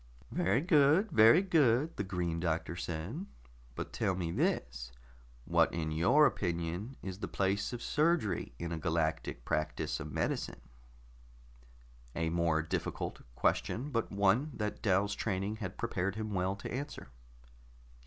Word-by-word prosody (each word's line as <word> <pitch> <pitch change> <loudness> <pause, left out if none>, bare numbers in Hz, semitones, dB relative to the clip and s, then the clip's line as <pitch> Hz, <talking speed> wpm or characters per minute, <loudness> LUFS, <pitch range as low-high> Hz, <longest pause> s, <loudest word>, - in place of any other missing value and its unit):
"Very 100 +9 +2
good, 165 +4 +4
very 115 - +7
good," 155 -5 +3
the - - -2
Green 90 -3 -2
Doctor 85 0 -1
said. 90 - -4 0.5
"But - - -5
tell 95 - 0
me 85 -2 -2
this: 75 - -1 0.5
what - - +3
in 80 -2 -2
your 90 - +5
opinion 85 - -2
is 95 0 -5
the - - -3
place 100 +1 0
of 120 -1 -5
surgery 150 - +1
in 85 +4 -4
a 80 - -3
Galactic 80 -1 -1
practice 75 0 -1
of 75 -1 -6
medicine?" - - -2 1.5
A 80 -1 0
more 85 -2 +1
difficult 80 - -3
question, 135 - 0
but 115 -3 -1
one 100 +8 +2
that 105 -1 -3
Dal's 100 0 +2
training 100 +1 -2
had 95 -3 -6
prepared 100 -4 -1
him 110 -1 -4
well 95 +1 0
to 100 - -7
answer. 140 - -5
95 Hz, 140 wpm, -32 LUFS, 85-120 Hz, 1.5 s, very